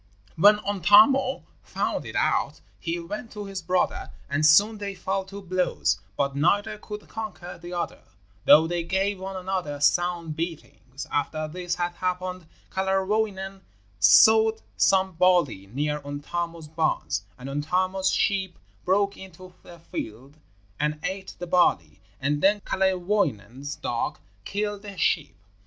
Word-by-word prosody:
When 205 +5 +6
Untamo 210 - +5 0.2
found - - -2
it - - -8
out - - +1 0.2
he 170 0 -3
went 210 +7 -7
to 210 -1 -6
his 195 -1 -5
brother, 180 +2 0 0.2
and 145 +2 -1
soon 205 +8 +5
they 200 -1 -4
fell 195 +1 -2
to 200 +1 -9
blows; 185 - 0 0.2
but 140 -1 0
neither 200 +9 +1
could 210 0 -8
conquer 210 -6 -7
the 175 +1 -8
other, 175 -1 -4 0.4
though 155 +2 +8
they 175 +1 -1
gave 190 +3 -1
one 190 +1 -6
another 185 -6 -3
sound 170 +1 +1
beatings. 150 -5 -6
After 155 +2 -1
this 175 +2 -3
had 175 0 -1
happened, 185 -1 -3 0.2
Kalerwoinen 195 0 -1 0.4
sowed 220 - +6
some 190 0 +3
barley 170 - +2
near 150 +7 -2
Untamo's 165 +3 -5
barns; 155 -8 -1 0.2
and 125 - -9
Untamo's 185 +7 0
sheep 190 -3 0 0.3
broke 200 +2 +1
into 185 -1 -12
the 175 - -13
field 135 -3 -7 0.4
and 150 +1 0
ate 190 0 -4
the 175 - -5
barley, 100 - +2 0.2
and 145 +2 0
then 205 +1 +3
Kalerwoinen's 180 - -1
dog 120 - -3 0.3
killed 205 0 -3
the 200 -2 -9
sheep. 155 -3 0
180 Hz, 135 wpm, -25 LUFS, 155-195 Hz, 0.4 s, though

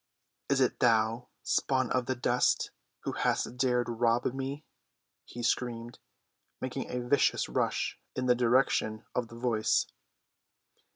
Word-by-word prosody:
"Is 140 -1 +3
it 130 - +1
thou, 115 0 +2 0.2
spawn 130 -3 +1
of 125 -1 +1
the 130 - 0
dust, 125 0 +1 0.3
who - - -3
hast - - 0
dared 125 -1 +2
rob 120 0 +1
me?" 135 +3 -4 0.6
he 120 - -8
screamed, 120 -1 -1 0.6
making 130 0 -4
a 125 -1 -3
vicious 140 +2 +3
rush - - -1 0.2
in 130 - -1
the 125 - +5
direction 120 -3 +2
of 125 -2 -1
the 115 - -12
voice. 115 -3 +2
125 Hz, 130 wpm, -30 LUFS, 115-130 Hz, 0.6 s, the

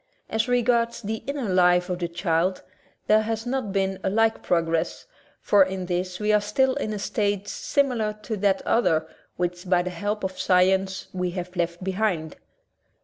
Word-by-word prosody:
As 220 +2 +1
regards 235 -1 +1
the 220 +2 -3
inner 280 -4 -2
life 180 -1 +4
of 180 -2 -3
the 175 - -1
child 170 +1 0 0.4
there 215 +1 +5
has 225 +1 -3
not 245 -4 -2
been 190 -1 0
a - - +1
like 225 +2 +2
pro 170 -2 +2
gress, 165 0 -2 0.3
for 205 - +4
in 190 0 -4
this 180 0 -2
we 210 0 +1
are 210 - +4
still 260 +6 +2
in 215 - -3
a 210 - -3
stage 205 0 -1
similar 245 -7 0
to 220 - -3
that 195 -1 +1
other 160 -9 +2 0.3
which, 180 +1 -3
by 180 -1 +3
the 180 - -4
help 205 +4 -3
of 190 0 -4
science, 190 +1 +2
we 180 -1 -1
have 180 +1 -5
left 175 0 -2
behind. 185 -5 -1
190 Hz, 180 wpm, -25 LUFS, 180-220 Hz, 0.4 s, there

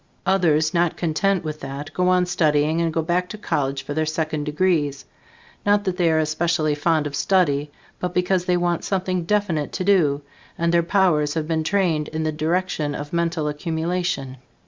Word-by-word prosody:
Others 160 -5 +2
not 170 -1 +1
content 180 +3 0
with 155 -1 -5
that, 140 +2 -7
go 180 0 +1
on 180 0 +3
studying 155 -2 +1
and 165 -1 +1
go 160 0 -1
back 180 +2 0
to 215 - -7
college 135 -8 -2
for 145 - -5
their 155 +1 0
second 155 -1 -2
degrees; 150 -3 0 0.6
not 205 0 +3
that 185 -2 -2
they 175 -3 +3
are 160 - +2
especially 155 0 +1
fond 155 +1 +1
of 145 -1 -4
study, 150 -6 +1 0.3
but 180 - -2
because 180 0 +1
they 180 -1 +2
want 175 -1 0
something 185 -2 -1
definite 190 -7 0
to - - -2
do, 155 -8 +3 0.3
and 170 0 +1
their 170 - +5
powers 170 -5 +2
have 155 -2 -2
been 160 -1 0
trained 165 -4 +1
in 160 0 -3
the 155 - 0
direction 155 -1 -1
of 145 +2 -7
mental 170 -2 0
accumulation. 160 -2 -2
165 Hz, 185 wpm, -22 LUFS, 150-180 Hz, 0.6 s, their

